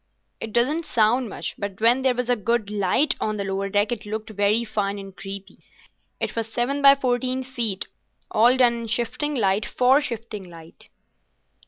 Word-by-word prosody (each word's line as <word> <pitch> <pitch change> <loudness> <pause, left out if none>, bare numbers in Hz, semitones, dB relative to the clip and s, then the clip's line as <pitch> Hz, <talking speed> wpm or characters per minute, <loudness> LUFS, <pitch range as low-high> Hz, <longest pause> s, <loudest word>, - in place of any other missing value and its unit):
It 225 - -5
doesn't 285 +9 +2
sound 235 +1 +2
much, - - -5
but 200 -1 -5
when 235 +4 +4
there 260 -1 +2
was 250 0 -2
a 245 - +3
good 215 -1 -1
light 210 +8 +2
on 215 0 -2
the 200 - -2
lower 195 0 -2
deck 205 +3 +1
it 235 -3 -3
looked 220 +1 -5
very 205 +2 +2
fine 205 -3 -2
and 195 -1 -10
creepy. 195 0 -8 0.6
It - - -2
was 225 -1 -2
seven 255 +5 -1
by 275 0 +8
fourteen 255 0 -1
feet, 235 -6 -1 0.5
all 240 +4 +4
done 245 -2 +5
in 235 -1 -5
shifting 240 +6 -1
light 200 -3 +1
for 260 +3 +3
shifting 225 -7 -6
light." 165 -1 -14
225 Hz, 180 wpm, -23 LUFS, 205-250 Hz, 0.6 s, by